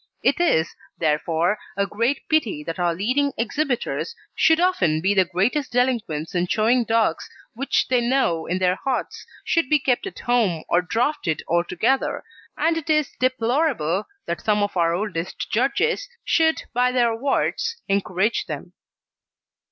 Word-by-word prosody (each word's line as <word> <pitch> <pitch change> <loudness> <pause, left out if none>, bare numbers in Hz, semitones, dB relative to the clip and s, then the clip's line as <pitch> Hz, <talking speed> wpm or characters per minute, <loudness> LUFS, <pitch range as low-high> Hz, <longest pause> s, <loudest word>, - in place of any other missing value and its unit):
It - - +2
is, 165 - +2 0.2
therefore, 165 +5 +1 0.2
a 200 - +2
great 235 +7 -1
pity 240 - 0
that 165 +3 -5
our 175 -1 +1
leading 255 +9 0
exhibitors 270 - -2 0.2
should 320 0 +4
often 190 - +2
be 190 +5 +2
the 190 -2 +4
greatest 230 - 0
delinquents 230 -11 0
in 180 0 0
showing 230 +5 +2
dogs 225 -1 +1 0.2
which 270 +4 0
they 250 -1 +2
know 235 -10 +1
in 180 - 0
their 185 0 +1
hearts 265 -2 -3 0.2
should 330 -7 +1
be 300 - +5
kept 265 +6 0
at 385 - -9
home 220 -10 +1
or 175 - +3
drafted 225 - -1
altogether, 180 +10 0 0.3
and 325 +2 +1
it 325 -1 -6
is 305 -3 +2
deplorable 245 - 0 0.2
that 170 - -3
some 210 -1 +2
of 205 - -3
our 170 -1 +2
oldest 185 -3 -4
judges 445 - +1 0.2
should 320 -1 +2
by 250 +1 +2
their 240 -2 +2
awards 280 - -1
encourage 195 +2 0
them. - - -7
230 Hz, 150 wpm, -23 LUFS, 180-275 Hz, 0.3 s, be